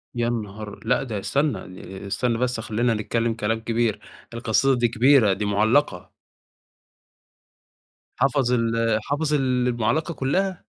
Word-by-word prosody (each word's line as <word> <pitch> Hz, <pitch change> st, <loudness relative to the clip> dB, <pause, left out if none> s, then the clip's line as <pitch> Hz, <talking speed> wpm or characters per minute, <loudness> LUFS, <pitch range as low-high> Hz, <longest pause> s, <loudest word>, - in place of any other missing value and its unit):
يا 120 Hz, 0 st, 0 dB
نهار! 105 Hz, -2 st, -5 dB
لا 125 Hz, +3 st, +2 dB
ده 110 Hz, -6 st, -4 dB
استنى، 100 Hz, -8 st, -3 dB
استنى 120 Hz, +3 st, -1 dB
بس 125 Hz, -1 st, -1 dB
خلّينا 115 Hz, +2 st, 0 dB
نتكلم 115 Hz, +2 st, -1 dB
كلام 110 Hz, 0 st, -1 dB
كبير، 115 Hz, -2 st, -1 dB, 0.3 s
القصيدة 120 Hz, +3 st, +2 dB
دي 120 Hz, -1 st, +2 dB
كبيرة 120 Hz, -3 st, +4 dB
دي 105 Hz, +2 st, -3 dB
مُعلّقة. 105 Hz, 0 st, +1 dB, 2.1 s
حفظ 135 Hz, -2 st, +2 dB
ال 115 Hz, -2 st, +1 dB
حفظ 150 Hz, +1 st, -1 dB
المُعلّقة 125 Hz, +2 st, 0 dB
كلّها! 180 Hz, +7 st, -1 dB
115 Hz, 115 wpm, -23 LUFS, 110-130 Hz, 2.1 s, كبيرة